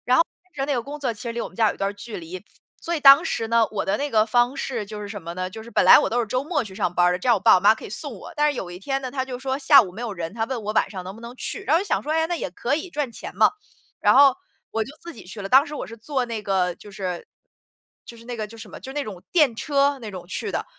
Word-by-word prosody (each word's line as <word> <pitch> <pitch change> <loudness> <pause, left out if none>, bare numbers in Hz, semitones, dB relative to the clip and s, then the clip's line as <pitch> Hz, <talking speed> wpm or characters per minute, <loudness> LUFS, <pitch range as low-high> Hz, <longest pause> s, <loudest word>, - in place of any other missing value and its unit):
然 250 +1 +5
后 - - +6 0.2
其 370 - -35
实 270 - +1
那 285 - 0
个 245 - 0
工 285 +5 -8
作 255 -5 -1
其 210 - -10
实 235 - -4
离 235 0 -3
我 - - -4
们 - - -18
家 225 -2 +3
有 - - -4
一 - - -19
段 195 +1 -1
距 215 +2 -7
离， 175 +2 -8 0.4
所 340 - -2
以 - - -2
当 280 +2 +8
时 230 -11 -2
呢， 230 0 +4
我 210 - -2
的 195 +2 0
那 290 +1 -2
个 215 -4 +3
方 240 +3 +2
式， 240 -6 -3
就 210 +1 -7
是 205 - -6
什 205 -1 -7
么 170 0 -7
呢， 185 0 -3
就 220 +4 -9
是 235 - -11
本 - - +3
来 - - +10
我 - - 0
都 240 - 0
是 235 - 0
周 255 +5 -1
末 310 -2 -1
去 200 -4 -10
上 175 - -1
班 175 0 +3
儿 180 - +4
的， 180 - -2
这 190 - -5
样 235 - +6
我 - - -1
爸 - - +6
我 - - +3
妈 205 +4 +5
可 - - -10
以 - - -8
送 275 +6 -5
我， - - -11
但 300 -1 +3
是 280 - -7
有 180 - -5
一 175 - -9
天 270 +7 -2
呢， 260 -2 -5
他 260 -1 -1
就 260 -1 -6
是 - - -16
说 265 0 -1
下 280 0 +7
午 190 -6 -6
没 210 +6 -9
有 235 -4 -3
人， 170 -1 -5
他 225 0 -2
问 245 -1 -4
我 210 +1 -3
晚 - - +2
上 190 -3 -7
能 190 +2 -8
不 225 - -13
能 235 +1 -9
去？ 390 - -5
然 310 - +1
后 - - +4
我 - - -2
就 - - -10
想 - - +1
说， 300 - -4
诶， 320 0 +2
那 350 - -1
也 330 - -4
可 245 +9 -1
以， 335 +4 -5
赚 295 -6 -3
钱 - - -9
嘛。 - - +5 0.5
然 - - +4
后， 275 0 +7 0.4
我 225 - 0
就 255 - -11
自 340 0 -9
己 235 - -12
去 205 +3 -8
了， 195 - -4
当 270 +5 +6
时 300 - -7
我 - - -4
是 230 - -10
做 255 +3 -2
那 230 -2 -4
个， 190 -3 0
就 210 - -14
是 185 -3 -5 0.8
就 235 - -12
是 230 - -15
那 245 0 -5
个 215 -2 -4
就 230 +2 -13
什 225 - -10
么， - - -10
就 265 - -8
那 290 0 -2
种 195 -7 -8
电 300 -9 +4
车 280 +2 +1
那 225 -4 -7
种 185 -3 -8
去 190 - -4
的， - - -2
235 Hz, 375 characters per minute, -23 LUFS, 205-275 Hz, 0.8 s, 来